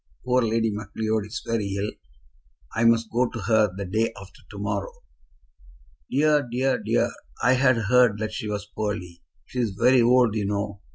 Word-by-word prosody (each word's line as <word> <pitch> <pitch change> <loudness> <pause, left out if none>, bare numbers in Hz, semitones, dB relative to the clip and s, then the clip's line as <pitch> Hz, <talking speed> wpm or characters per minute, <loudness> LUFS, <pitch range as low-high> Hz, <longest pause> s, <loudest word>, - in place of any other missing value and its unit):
Poor 125 0 +3
Lady 115 -1 +1
Macleod 110 +1 -2
is 110 +1 -6
very 105 -4 -2
ill. 105 +2 -2 0.8
I 115 +1 +1
must 115 -1 +3
go 125 +1 +1
to 115 - -7
her 110 0 +3
the 100 - -4
day 110 +5 0
after 95 0 -14
to 100 - -10
morrow." 100 0 -3 1.2
"Dear, 150 +2 +3
dear, 130 +1 0
dear! - - +1 0.3
I 125 +2 +5
had 130 -1 +3
heard 115 0 +3
that 110 0 -4
she 105 - -4
was 105 0 -3
poorly. 100 -5 -5 0.2
She 125 - -6
is 110 -6 -1
very 125 +1 +5
old, 120 -1 +4
you 105 -2 -1
know. 100 0 -3
110 Hz, 175 wpm, -25 LUFS, 105-120 Hz, 1.2 s, I